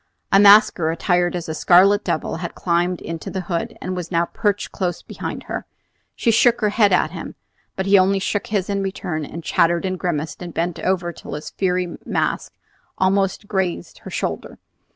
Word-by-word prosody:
A 195 - +6
masker 200 -5 +6
attired 175 +1 +1
as 175 -2 -4
a 160 - -3
scarlet 190 +6 +5
devil 155 - -2
had 170 0 -6
climbed 175 0 0
into 165 -1 -6
the 190 - -3
hood, 175 -2 -3
and 185 - -4
was 180 -2 -5
now 170 -1 +1
perched 205 +2 -1
close 180 -2 -3
behind - - -6
her. - - -5 0.5
She 230 - +2
shook 235 +1 +4
her 210 - +3
head 205 -1 +3
at 170 -3 +2
him; 170 -2 -7 0.4
but 190 - -2
he 200 0 +6
only 195 +1 +3
shook 200 +1 -2
his 200 -3 -1
in 200 -1 -1
return, 185 -5 -3
and 165 +3 -7
chattered 170 +3 +2
and 185 -1 -2
grimaced, 160 -3 -3
and 175 -2 -7
bent 170 0 -1
over 175 -2 -1
till - - -8
his 150 - -7
fiery 180 -2 -1
mask - - -1 0.5
almost 195 +2 +1
grazed 190 - -2
her - - -10
shoulder. - - -4
180 Hz, 190 wpm, -21 LUFS, 170-195 Hz, 0.5 s, A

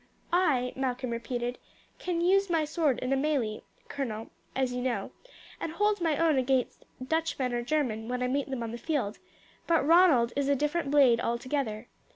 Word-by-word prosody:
"I," 275 -9 +2
Malcolm 255 -1 -2
repeated 240 +1 -3 0.4
"I - - -16
can 350 -2 -1
use 390 +2 +3
my 325 -2 +2
sword 300 -4 +1
in 255 +1 0
a - - +3
melee, 270 -7 0 0.3
colonel, 225 -6 -4 0.2
as 260 -2 0
you 250 - -2
know, 255 -1 -2 0.5
and 320 - -4
hold 415 +1 +1
my 320 -4 +1
own 320 -4 +3
against 260 -1 0 0.2
Dutchman 320 -6 -1
or 240 - 0
German 240 -5 -1
when 250 +1 -2
I - - +1
meet 275 +2 -1
them 260 -3 -3
on 225 - -4
the 235 - -6
field; 245 -7 -2 0.5
but 330 -4 +3
Ronald 310 -8 +5
is 280 0 0
a 280 - +4
different 295 +2 -1
blade 270 -5 +5
altogether. 235 -2 -2
270 Hz, 185 wpm, -29 LUFS, 245-315 Hz, 0.5 s, Ronald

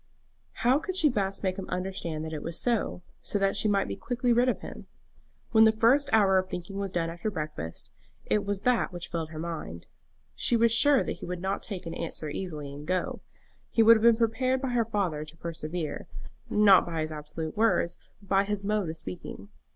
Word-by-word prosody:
How 255 +4 +5
could 365 +4 -5
she 315 -5 +5
best 195 -5 -1
make 185 0 -1
him 195 - -7
understand 180 -4 -3
that 160 - -6
it 150 - -4
was 165 0 -1
so, 230 -6 0 0.2
so - - 0
that 195 -1 +1
she - - +2
might 200 -1 +2
be - - -4
quickly 245 0 0
rid 245 +2 +3
of - - -2
him? - - -9 0.6
When 220 -1 +6
the 220 - +7
first 245 +6 +3
hour 195 -4 +5
of 185 0 -4
thinking 180 +3 -6
was 195 -1 -3
done 165 -2 -1
after 170 +5 -3
breakfast, 150 - -6 0.3
it 210 - +1
was 200 -1 -3
that 250 -4 +2
which 175 -1 -6
filled 165 -2 -4
her 160 - -9
mind. 155 - -6 0.5
She 235 - +2
was 230 0 +4
sure 285 +3 +5
that - - -4
he - - -8
would 180 0 -4
not 190 +2 -2
take 190 -4 -6
an 165 - -5
answer 155 -2 -4
easily 150 -5 -5
and 145 +1 -9
go. 185 0 -1 0.5
He 225 - +3
would 230 +1 +9
have 220 - 0
been 235 0 +6
prepared 250 +3 +1
by 265 0 -2
her 240 -2 +1
father 195 -9 -1
to 155 +2 -12
persevere, 165 -1 -5 0.4
not 205 -3 +6
by 165 -2 -3
his 155 0 -3
absolute 155 +1 -6
words, 215 -6 +1 0.2
but 200 - -18
by 195 +1 +3
his 205 0 -2
mode 205 -3 0
of 160 - -5
speaking. 90 - -8
195 Hz, 215 wpm, -28 LUFS, 165-225 Hz, 0.6 s, would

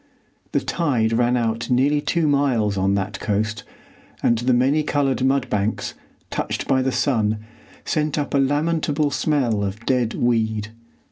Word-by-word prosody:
The - - +3
tide 125 -10 0
ran 120 +1 +2
out 115 0 -1
nearly 140 +4 +2
two 165 +1 0
miles 130 -8 +2
on 95 +1 +1
that 100 0 -3
coast, 105 +1 -1 0.6
and 120 - +4
the 125 +2 +1
many 130 +5 +3
coloured 140 -3 0
mud 135 0 +2
banks, 105 -1 -1 0.4
touched - - -3
by 130 -1 +3
the 130 0 0
sun, 110 -6 +1 0.5
sent 155 -1 0
up 145 - -2
a 140 - +3
lamentable 150 +1 +1
smell 130 -8 +1
of 100 +3 -5
dead 125 -3 +1
weed. 110 -3 0
125 Hz, 150 wpm, -22 LUFS, 110-145 Hz, 0.6 s, and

